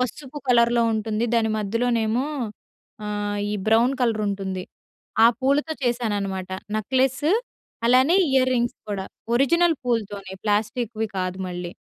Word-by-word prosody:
పసుపు 265 Hz, +4 st, -4 dB
కలర్‌లో 235 Hz, -1 st, +4 dB
ఉంటుంది. 220 Hz, +1 st, -1 dB
దాని 225 Hz, -1 st, +2 dB
మధ్యలోనేమో 230 Hz, +3 st, 0 dB, 0.8 s
ఆహ్, 205 Hz, 0 st, -2 dB
ఈ -, -, -1 dB
బ్రౌన్ 230 Hz, +4 st, +4 dB
కలరుంటుంది. 200 Hz, -5 st, -1 dB, 0.6 s
ఆ -, -, +10 dB
పూలతో 285 Hz, +4 st, +1 dB
చేశాననమాట 205 Hz, -6 st, -1 dB, 0.3 s
నెక్లెసు 260 Hz, -, +1 dB, 0.5 s
అలానే 260 Hz, +8 st, +5 dB, 0.2 s
ఇయర్ 255 Hz, -1 st, +4 dB
రింగ్స్ 240 Hz, 0 st, 0 dB
కూడా. 195 Hz, -1 st, -3 dB, 0.3 s
ఒరిజినల్ 335 Hz, +5 st, +3 dB
పూలతోనే 205 Hz, -5 st, -2 dB
ప్లాస్టిక్‌వి 220 Hz, +1 st, -1 dB
కాదు 185 Hz, +1 st, -3 dB
మళ్ళీ. 175 Hz, -1 st, -5 dB
230 Hz, 110 wpm, -24 LUFS, 205-255 Hz, 0.8 s, ఆ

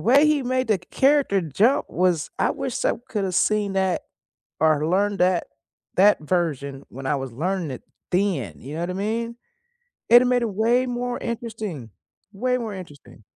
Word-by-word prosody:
way 275 Hz, +6 st, +5 dB
he 300 Hz, -2 st, +2 dB
made 255 Hz, 0 st, 0 dB
the 210 Hz, -3 st, +3 dB
character 265 Hz, -, +2 dB
jump 195 Hz, -, +2 dB
was 175 Hz, -3 st, +1 dB
I -, -, +2 dB
wish -, -, -3 dB
I -, -, +3 dB, 0.2 s
could 210 Hz, -3 st, -2 dB
have 185 Hz, -2 st, -2 dB
seen 210 Hz, 0 st, +2 dB
that 190 Hz, -2 st, 0 dB, 0.6 s
or 155 Hz, -1 st, +3 dB
learned 200 Hz, +3 st, +1 dB
that 180 Hz, -1 st, +2 dB, 0.5 s
that 205 Hz, +3 st, +5 dB
version 145 Hz, -5 st, -2 dB
when 135 Hz, +2 st, -9 dB
I 145 Hz, -, +1 dB
was 135 Hz, -2 st, -5 dB
learning 170 Hz, +4 st, -2 dB
it 130 Hz, -, -8 dB, 0.3 s
then, 180 Hz, -7 st, 0 dB
you 140 Hz, +4 st, -9 dB
know 165 Hz, -, -3 dB
what 175 Hz, -, -2 dB
I -, -, -2 dB
mean, 230 Hz, +4 st, -2 dB, 0.7 s
it'd 240 Hz, +1 st, +8 dB
a -, -, +1 dB
made 250 Hz, -1 st, +2 dB
it 235 Hz, -, 0 dB
way 235 Hz, +5 st, +2 dB
more 245 Hz, 0 st, -3 dB
interesting 220 Hz, -, -5 dB, 0.4 s
way 250 Hz, +5 st, 0 dB
more 225 Hz, -4 st, -4 dB
interesting. 145 Hz, -, -12 dB
195 Hz, 180 wpm, -23 LUFS, 165-235 Hz, 0.7 s, it'd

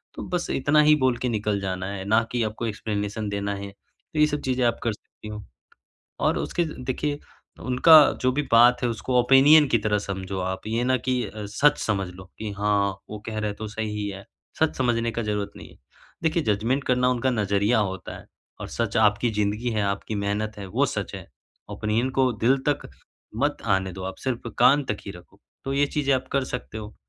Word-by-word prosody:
तो -, -, -6 dB
बस 180 Hz, -1 st, -2 dB
इतना 145 Hz, +3 st, +3 dB
ही 150 Hz, 0 st, +6 dB
बोल 130 Hz, -4 st, +1 dB
के 125 Hz, -, -2 dB
निकल 105 Hz, -2 st, -1 dB
जाना 95 Hz, -1 st, -3 dB
है 95 Hz, -1 st, -5 dB
ना 110 Hz, +3 st, +4 dB
कि 120 Hz, -1 st, -1 dB
आपको 110 Hz, +2 st, -3 dB
एक्सप्लेनेशन 105 Hz, 0 st, -3 dB
देना 100 Hz, 0 st, -2 dB
है। 100 Hz, 0 st, -6 dB
तो 125 Hz, +9 st, -11 dB
ये 150 Hz, -, +7 dB
सब 150 Hz, -1 st, -3 dB
चीज़ें 130 Hz, -1 st, 0 dB
आप 120 Hz, -1 st, +1 dB
कर 115 Hz, -2 st, 0 dB
सकती 105 Hz, -, -14 dB
हो। 105 Hz, 0 st, -7 dB, 0.8 s
और -, -, +1 dB
उसके 175 Hz, -, -1 dB, 0.2 s
देखिए 145 Hz, +3 st, -2 dB, 0.5 s
उनका 130 Hz, +6 st, +5 dB, 0.3 s
जो 130 Hz, 0 st, +3 dB
भी 145 Hz, -, +1 dB
बात 120 Hz, +1 st, +6 dB
है 120 Hz, -, +2 dB
उसको 125 Hz, +2 st, 0 dB
ओपिनियन 140 Hz, +4 st, +6 dB
की -, -, +4 dB
तरह 105 Hz, 0 st, +1 dB
समझो 95 Hz, -1 st, -5 dB
आप 95 Hz, +1 st, -3 dB
ये 115 Hz, +2 st, 0 dB
ना 130 Hz, 0 st, +2 dB
कि 125 Hz, 0 st, -1 dB
अ, 105 Hz, -1 st, -7 dB
सच 145 Hz, +9 st, +3 dB
समझ 100 Hz, -3 st, -1 dB
लो 95 Hz, 0 st, -11 dB
कि 110 Hz, -1 st, -4 dB
हाँ, 100 Hz, -1 st, +2 dB, 0.2 s
वो 105 Hz, 0 st, -6 dB
कह 110 Hz, -1 st, -4 dB
रहे 105 Hz, -1 st, -1 dB
हैं 100 Hz, -, -5 dB
तो 110 Hz, -, -5 dB
सही 110 Hz, +1 st, -4 dB
ही 105 Hz, -1 st, -2 dB
है। 95 Hz, 0 st, -8 dB, 0.3 s
सच 160 Hz, -1 st, +2 dB
समझने 115 Hz, -2 st, +1 dB
का 115 Hz, -, -3 dB
ज़रूरत 105 Hz, -1 st, -2 dB
नहीं -, -, -11 dB
है, -, -, -18 dB, 0.5 s
देखिए 160 Hz, 0 st, +1 dB
जजमेंट 125 Hz, +7 st, -1 dB
करना 125 Hz, 0 st, +2 dB
उनका 125 Hz, +1 st, +1 dB
नज़रिया 105 Hz, +1 st, +1 dB
होता 95 Hz, -3 st, -3 dB
है -, -, -15 dB, 0.4 s
और -, -, -5 dB
सच -, -, -2 dB
आपकी 110 Hz, +2 st, +3 dB
जिंदगी 105 Hz, +4 st, 0 dB
है, 105 Hz, -1 st, 0 dB
आपकी 100 Hz, +2 st, -2 dB
मेहनत 105 Hz, +1 st, -2 dB
है 100 Hz, -, -6 dB
वो -, -, +1 dB
सच -, -, -4 dB
है। -, -, -9 dB, 0.4 s
ओपिनियन 110 Hz, +4 st, -1 dB
को 130 Hz, -1 st, +4 dB
दिल 135 Hz, +2 st, +5 dB
तक 145 Hz, -, -2 dB, 0.5 s
मत -, -, +1 dB, 0.2 s
आने 95 Hz, -1 st, -2 dB
दो 95 Hz, +1 st, -7 dB
आप 95 Hz, -, -5 dB
सिर्फ 120 Hz, -2 st, -2 dB
कान 145 Hz, +1 st, +6 dB
तक 105 Hz, -, -4 dB
ही 100 Hz, -, -5 dB
रखो। 90 Hz, -1 st, -16 dB, 0.2 s
तो 135 Hz, -, -2 dB
ये 145 Hz, +1 st, +3 dB
चीज़ें 140 Hz, -2 st, 0 dB
आप 130 Hz, 0 st, -4 dB
कर 140 Hz, -1 st, +2 dB
सकते 125 Hz, -4 st, -6 dB
हो। 105 Hz, 0 st, -8 dB
110 Hz, 215 wpm, -25 LUFS, 100-130 Hz, 0.8 s, ये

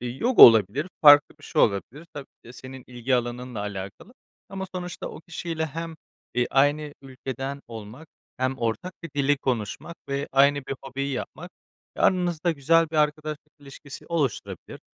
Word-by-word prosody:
yoga 130 Hz, -, +3 dB
olabilir, 115 Hz, -, +7 dB, 0.2 s
farklı 145 Hz, -1 st, +8 dB
bir 155 Hz, -, -16 dB
şey -, -, +1 dB
olabilir 120 Hz, +10 st, -1 dB
tabii 145 Hz, -2 st, -7 dB
ki -, -, -77 dB
de -, -, -10 dB
senin 130 Hz, +1 st, -11 dB
ilgi 125 Hz, +1 st, -2 dB
alanınla 120 Hz, -2 st, -3 dB
alakalı. 100 Hz, -, -7 dB, 0.3 s
Ama 190 Hz, -1 st, -5 dB
sonuçta 180 Hz, -1 st, -6 dB
o -, -, -10 dB
kişiyle 165 Hz, -1 st, -4 dB
hem, 165 Hz, +2 st, -6 dB, 0.4 s
ııı, 125 Hz, -, +2 dB
aynı 145 Hz, +2 st, +2 dB
ülkeden 135 Hz, +1 st, -6 dB
olmak 115 Hz, +7 st, -10 dB, 0.3 s
hem 130 Hz, +1 st, -1 dB
ortak 115 Hz, +11 st, -2 dB
bir 165 Hz, -, -7 dB
dili 145 Hz, 0 st, +2 dB
konuşmak 130 Hz, +6 st, -3 dB
ve 140 Hz, +1 st, -3 dB
aynı 140 Hz, 0 st, +3 dB
bir 135 Hz, -, -3 dB
hobiyi 135 Hz, +1 st, -4 dB
yapmak, 165 Hz, +7 st, -6 dB, 0.5 s
e, -, -, -8 dB
aranızda 175 Hz, -2 st, +2 dB
güzel 165 Hz, +2 st, +2 dB
bir 160 Hz, -, -4 dB
arkadaşlık 150 Hz, 0 st, -1 dB
ilişkisi 140 Hz, 0 st, -12 dB
oluşturabilir. 150 Hz, -8 st, -3 dB
140 Hz, 155 wpm, -25 LUFS, 125-160 Hz, 0.5 s, farklı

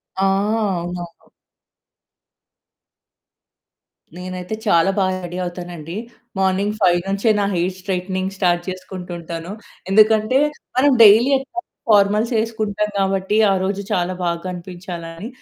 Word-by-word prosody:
ఆ! 190 Hz, -, -1 dB, 0.6 s
అవునవును. 175 Hz, -1 st, -8 dB, 2.9 s
నేనైతే 185 Hz, +2 st, -5 dB
చాలా 170 Hz, 0 st, +4 dB
బాగా 185 Hz, -1 st, +1 dB
రెడీ 175 Hz, +1 st, -6 dB
అవుతానండి. 175 Hz, -1 st, -7 dB, 0.4 s
మార్నింగ్ 195 Hz, +2 st, +1 dB
5 180 Hz, -3 st, +4 dB
నుంచే 200 Hz, +3 st, +1 dB
నా 200 Hz, -, +1 dB
హెయిర్ 180 Hz, +1 st, -1 dB
స్ట్రెయిగ్టెనింగ్ 185 Hz, 0 st, -3 dB
స్టార్ట్ 175 Hz, -2 st, +2 dB
చేసుకుంటూంటాను. 175 Hz, -2 st, -7 dB, 0.4 s
ఎందుకంటే, 215 Hz, +4 st, +4 dB, 0.4 s
మనం 280 Hz, +2 st, +5 dB
డైలీ 220 Hz, +6 st, +7 dB
ఎట్లాగో 345 Hz, +7 st, -6 dB, 0.3 s
ఫార్మల్స్ 210 Hz, +3 st, +3 dB
వేసుకుంటాం 215 Hz, -2 st, -1 dB
కాబట్టి 195 Hz, +2 st, 0 dB, 0.2 s
ఆరోజు 195 Hz, +1 st, -1 dB
చాలా 180 Hz, +1 st, 0 dB
బాగా 170 Hz, -1 st, -1 dB
కనిపించాలని 175 Hz, 0 st, -7 dB
190 Hz, 100 wpm, -20 LUFS, 175-205 Hz, 2.9 s, డైలీ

